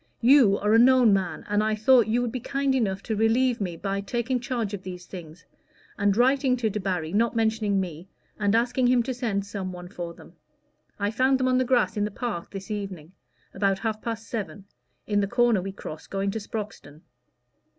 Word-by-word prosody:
You 240 -5 +6
are 210 +1 +1
a 225 - +6
known 250 -3 +6
man, 190 -2 -1
and 205 0 +1
I 215 0 +1
thought 235 +2 +4
you 240 +3 +1
would 240 - -2
be 255 - -4
kind 275 +2 -1
enough 200 -7 0
to 220 - -2
relieve 230 +2 +2
me 175 -4 -3
by 195 +2 -2
taking 240 +4 -1
charge 235 -4 -3
of 200 - -4
these 180 -1 -8
things, 170 -2 -11 0.5
and 200 0 +1
writing 260 +1 +3
to 225 -3 0
Debarry, 185 -5 -2
not 230 +3 +1
mentioning 220 -3 +1
me, 175 -1 -5 0.3
and 205 0 +2
asking 245 +2 +2
him 245 -1 +3
to 260 +2 -3
send 220 -6 -2
some 195 -2 -5
one 180 -1 -9
for 170 -3 -6
them. - - -15 0.6
I 205 0 -1
found 260 +4 +2
them 255 - +1
on 255 0 +3
the 255 - +1
grass 240 -7 +1
in 205 - +1
the - - -2
park 210 -5 -4
this 195 +1 -8
evening 190 -6 -5 0.4
about 195 0 +1
half 215 0 -3
past 225 -1 -5
seven, 205 -3 -5 0.4
in 205 -1 +1
the 200 - +1
corner 240 -2 +2
we 195 +2 -5
cross 155 -5 -9
going 195 0 -2
to 220 - -3
Sproxton." 205 -9 -7
210 Hz, 205 wpm, -26 LUFS, 195-240 Hz, 0.6 s, You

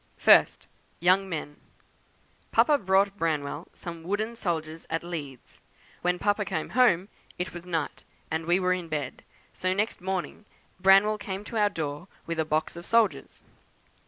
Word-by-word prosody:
First, - - +5 0.3
'Young 185 +3 +3
Men.' 150 -3 -5 0.9
Papa 295 -2 +4
bought 195 +1 +2
Branwell 155 -1 -2
some 170 -1 -8
wooden 205 +6 -2
soldiers 165 -6 -3
at 165 +1 -2
Leeds; 145 -7 -8 0.4
when 180 0 +1
Papa 205 +3 +1
came 160 -5 -3
home 210 -7 +3 0.3
it 180 - -4
was 175 +1 -9
night, 165 -4 -3 0.3
and 160 +1 -2
we 175 +2 +4
were 185 -1 +2
in 180 -2 -4
bed, 150 -5 -4 0.3
so 185 0 0
next 210 0 -1
morning 190 +2 -4 0.3
Branwell 195 +3 +5
came 195 0 -5
to 225 +2 -5
our 210 -1 +4
door 150 0 -5 0.2
with 165 -1 -3
a 160 - +2
box 155 +2 -1
of 170 - -8
soldiers. 230 +1 +1
180 Hz, 155 wpm, -27 LUFS, 160-195 Hz, 0.9 s, First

